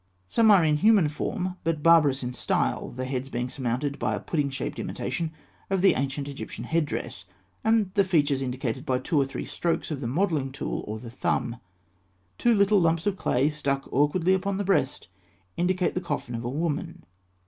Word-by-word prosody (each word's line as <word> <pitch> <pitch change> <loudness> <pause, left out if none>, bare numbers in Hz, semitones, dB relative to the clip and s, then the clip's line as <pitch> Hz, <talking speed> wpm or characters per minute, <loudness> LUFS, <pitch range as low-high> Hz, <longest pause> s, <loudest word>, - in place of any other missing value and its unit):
Some 220 - +4
are 195 -6 +7
in 150 -1 +3
human 200 -3 +5
form, 185 +4 -3
but 160 -3 -1
barbarous 150 -6 +5
in 125 0 -3
style, - - -1
the 130 +1 -5
heads 130 0 -3
being 120 0 -3
surmounted 130 +3 -2
by - - 0
a - - -4
pudding 150 -4 -1
shaped 135 - -4
imitation 165 -2 -3 0.4
of 190 -2 +1
the 195 - +7
ancient 140 +1 -2
Egyptian 140 -1 -6
head 165 -2 0
dress, 110 -7 -5 0.4
and 220 -3 +2
the 200 -1 +4
features 145 -7 +2
indicated 130 -1 -3
by 130 -4 +1
two 145 +3 +1
or - - +2
three 135 - -5
strokes 170 -1 -2
of 145 -3 -3
the 120 - -2
modelling 150 -1 0
tool 135 - -4
or 105 +1 -4
the 115 +1 -9
thumb. 120 -1 -1 0.8
Two 235 -1 +4
little 200 -1 +4
lumps 165 0 +2
of 205 -2 +1
clay 135 -6 +1
stuck 140 -2 -2
awkwardly 160 +7 +3
upon 190 +1 0
the 205 - -1
breast 150 - 0 0.5
indicate 180 +1 +1
the 180 - -2
coffin 145 -7 -4
of 115 0 -4
a 120 - -2
woman. 150 +2 -3
150 Hz, 190 wpm, -26 LUFS, 130-180 Hz, 0.8 s, are